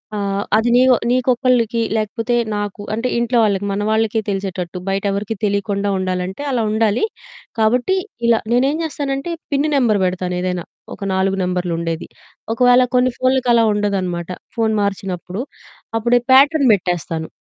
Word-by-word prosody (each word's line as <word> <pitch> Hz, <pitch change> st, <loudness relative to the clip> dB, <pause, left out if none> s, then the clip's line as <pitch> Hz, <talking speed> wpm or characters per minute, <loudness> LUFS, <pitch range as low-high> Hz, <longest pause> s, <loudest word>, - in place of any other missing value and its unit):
ఆ! -, -, -2 dB, 0.4 s
అది 225 Hz, +2 st, +1 dB
నీయో 255 Hz, 0 st, +6 dB, 0.2 s
నీకొక్కళ్ళకి 245 Hz, -2 st, +2 dB, 0.2 s
లేకపోతే 225 Hz, +3 st, -1 dB, 0.2 s
నాకు 205 Hz, 0 st, -4 dB
అంటే 230 Hz, +3 st, -1 dB
ఇంట్లో 240 Hz, +1 st, +1 dB
వాళ్ళకి 200 Hz, -2 st, +1 dB
మన 200 Hz, +1 st, -1 dB
వాళ్ళకి 220 Hz, 0 st, +1 dB
తెలిసేటట్టు 190 Hz, -2 st, -3 dB
బయట 195 Hz, 0 st, -1 dB
ఎవరికీ 205 Hz, +3 st, -3 dB
తెలియకుండా 200 Hz, 0 st, -1 dB
ఉండాలంటే, 185 Hz, +2 st, -3 dB
అలా 240 Hz, -3 st, 0 dB
ఉండాలి. 220 Hz, -, +1 dB, 0.6 s
కాబట్టి 245 Hz, +11 st, +2 dB, 0.3 s
ఇలా 230 Hz, -1 st, +4 dB
నేను 250 Hz, +2 st, +3 dB
ఏం 305 Hz, -, -2 dB
చేస్తానంటే 285 Hz, 0 st, -3 dB, 0.2 s
పిన్ 285 Hz, +2 st, +2 dB
నెంబర్ 235 Hz, -7 st, +3 dB
పెడతాను. 180 Hz, 0 st, -2 dB
ఏదైనా 180 Hz, -2 st, -2 dB, 0.3 s
ఒక -, -, -9 dB
4 190 Hz, +1 st, +1 dB
నెంబర్లు 180 Hz, -1 st, -1 dB
ఉండేది. 165 Hz, -1 st, -3 dB, 0.5 s
ఒకవేళ 245 Hz, +1 st, +5 dB
కొన్ని 250 Hz, 0 st, +3 dB
ఫోన్లకి 255 Hz, -1 st, +1 dB
అలా 230 Hz, -1 st, +4 dB
ఉండదనమాట, 185 Hz, -4 st, -2 dB, 0.3 s
ఫోను 220 Hz, -1 st, +1 dB
మార్చినప్పుడు 195 Hz, 0 st, -3 dB, 0.6 s
అప్పుడే 240 Hz, +2 st, +3 dB
ప్యాటర్న్ 280 Hz, 0 st, +5 dB
పెట్టేస్తాను. 170 Hz, -4 st, -2 dB
215 Hz, 140 wpm, -19 LUFS, 190-245 Hz, 0.6 s, నీయో